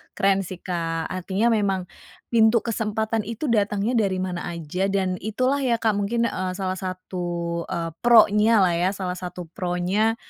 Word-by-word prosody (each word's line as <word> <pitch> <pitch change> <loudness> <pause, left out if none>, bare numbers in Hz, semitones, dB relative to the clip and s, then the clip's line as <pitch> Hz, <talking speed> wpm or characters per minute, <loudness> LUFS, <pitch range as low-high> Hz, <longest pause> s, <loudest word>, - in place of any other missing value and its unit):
Keren 195 0 +3
sih, 185 -2 -9
Kak. 165 -2 -2
Artinya 190 +5 0
memang 200 -4 +1 0.5
pintu 225 -1 +4
kesempatan 220 0 -1
itu 230 +4 -2
datangnya 205 0 +1 0.2
dari 190 - -2
mana 185 -1 -3
aja, 170 +2 -2
dan 190 -2 -1
itulah 255 +7 0
ya, 255 -4 +2
Kak, 225 -1 +1
mungkin, 205 +3 0
eee, 185 -5 -1
salah 185 -1 -3
satu, 175 -2 -4
eee 170 -2 -3
pro-nya 220 -2 +5
lah 180 - +3
ya, 180 +2 +2
salah 185 -2 -3
satu 180 0 -6
pro-nya, 185 +6 0
195 Hz, 155 wpm, -24 LUFS, 180-220 Hz, 0.5 s, pro-nya